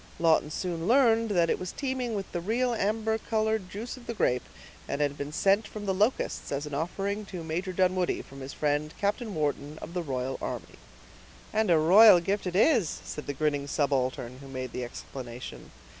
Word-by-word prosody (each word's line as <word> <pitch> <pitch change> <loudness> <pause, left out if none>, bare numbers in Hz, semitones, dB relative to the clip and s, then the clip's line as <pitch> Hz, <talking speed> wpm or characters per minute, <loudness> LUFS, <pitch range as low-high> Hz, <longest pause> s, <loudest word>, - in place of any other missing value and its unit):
Lawton 160 -2 +3
soon 170 +1 -3
learned 230 -2 +4
that 175 -4 +3
it - - 0
was 185 -1 -4
teeming 260 -4 -2
with 195 -2 -4
the 175 - -3
real 240 +6 +1
amber 220 +1 0
colored 220 -3 0
juice 225 +7 -6
of 245 - -14
the 235 - -3
grape, 125 - +2 0.5
and 140 - -2
had 145 -1 +1
been 145 0 -5
sent 195 +7 +2
from 210 -1 -7
the 195 - +1
Locusts, 210 +7 0
as 140 +1 -2
an 150 - -7
offering 195 +7 -2
to 180 -3 -6
Major 170 +4 -2
Dunwoodie, 185 -1 +1
from 135 - -12
his 135 +1 -6
friend 150 +1 -1
Captain 210 +1 -1
Wharton 150 0 -2
of 170 - -8
the 180 - -1
royal 130 -4 -3
army. - - -5 0.7
"And 215 -2 +2
a 170 - +6
royal 185 +5 +8
gift 195 +3 -1
it 180 - -3
is," 215 - +4 0.2
said 150 - -6
the 145 - -2
grinning 145 0 0
subaltern, 130 -3 -1
who 135 - -11
made 130 -2 -5
the 125 - -4
explanation. 125 0 -8
175 Hz, 195 wpm, -28 LUFS, 145-215 Hz, 0.7 s, royal